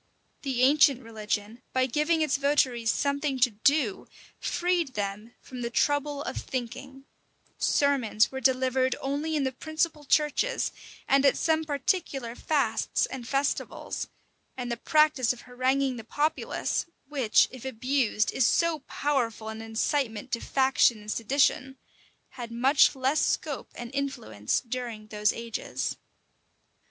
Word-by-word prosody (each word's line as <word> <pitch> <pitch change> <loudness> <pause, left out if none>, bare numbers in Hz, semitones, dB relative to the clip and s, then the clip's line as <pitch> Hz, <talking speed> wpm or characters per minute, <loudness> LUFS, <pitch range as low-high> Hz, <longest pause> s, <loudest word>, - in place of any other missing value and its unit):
The 260 -3 0
ancient 275 -1 +5
religion, 215 0 -4
by 260 0 +3
giving 300 +5 +1
its 295 -2 +1
votaries 265 -5 +2
something 280 -1 -1
to 245 -1 +5
do, 235 +1 +1 0.3
freed 345 -6 0
them 210 +3 -4
from 255 -1 -9
the 235 - -2
trouble 290 +3 0
of - - -5
thinking: 270 +2 -6 0.5
sermons 260 -6 +2
were 265 0 -5
delivered 260 0 +2
only 290 +4 -2
in 295 - +1
the 265 - 0
principal 315 +2 -2
churches, 300 - +1 0.4
and 275 0 +4
at 275 - +4
some 320 -1 +1
particular 280 -4 -1
fasts 270 -4 0
and 250 -3 -7
festivals: 275 +2 -2 0.5
and 245 -1 -4
the 235 - -2
practice 300 -3 +3
of 245 - -13
haranguing 255 +1 0
the 225 - -7
populace, 295 +9 -1 0.2
which, 265 -7 +3
if 255 -2 -10
abused, 255 -3 0
is 265 - +1
so 335 +5 +2
powerful 235 -6 -1
an 220 0 -6
incitement 225 +1 -2
to 235 - 0
faction 260 -5 +2
and 210 0 -6
sedition, 265 +2 +1 0.5
had 240 -2 -8
much 265 +5 +4
less 265 +3 +1
scope 290 -4 -2
and 240 +2 -8
influence 110 - -2
during 235 -3 -5
those 210 0 +1
ages. 230 -1 -4
265 Hz, 135 wpm, -27 LUFS, 235-285 Hz, 0.5 s, ancient